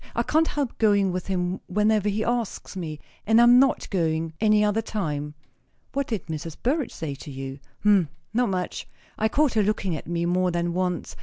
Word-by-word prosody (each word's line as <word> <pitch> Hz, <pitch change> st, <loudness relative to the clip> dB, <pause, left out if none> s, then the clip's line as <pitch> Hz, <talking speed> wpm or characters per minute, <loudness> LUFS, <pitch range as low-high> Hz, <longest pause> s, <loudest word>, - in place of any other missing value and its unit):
"I 235 Hz, -, +1 dB
can't 315 Hz, +5 st, +2 dB
help 285 Hz, -4 st, -3 dB
going 205 Hz, -3 st, +3 dB
with 180 Hz, 0 st, -4 dB
him 185 Hz, -1 st, -1 dB
whenever 210 Hz, +1 st, +2 dB
he 210 Hz, +2 st, -1 dB
asks 235 Hz, -4 st, -2 dB
me, 160 Hz, -5 st, -5 dB, 0.3 s
and 225 Hz, +1 st, +5 dB
I -, -, +7 dB
am 240 Hz, +1 st, +8 dB
not 270 Hz, 0 st, +2 dB
going 165 Hz, -3 st, 0 dB
any 215 Hz, -1 st, +4 dB
other 210 Hz, +2 st, +1 dB
time." 150 Hz, -9 st, -3 dB, 0.6 s
"What 275 Hz, 0 st, -1 dB
did 220 Hz, -7 st, -3 dB
Mrs. 160 Hz, 0 st, -6 dB
Burrage 280 Hz, +2 st, 0 dB
say 155 Hz, -3 st, -5 dB
to 140 Hz, -, -10 dB
you?" 135 Hz, 0 st, -6 dB, 0.2 s
"Hm! 200 Hz, -7 st, +4 dB, 0.2 s
Not 240 Hz, 0 st, +2 dB
much. 180 Hz, -2 st, -3 dB, 0.3 s
I 220 Hz, -, +2 dB
caught 295 Hz, +3 st, +2 dB
her 220 Hz, -, +3 dB
looking 195 Hz, -4 st, 0 dB
at 155 Hz, -, -7 dB
me 170 Hz, 0 st, -1 dB
more 180 Hz, +1 st, +2 dB
than 170 Hz, 0 st, -1 dB
once. 180 Hz, -1 st, -2 dB
195 Hz, 200 wpm, -25 LUFS, 170-220 Hz, 0.6 s, am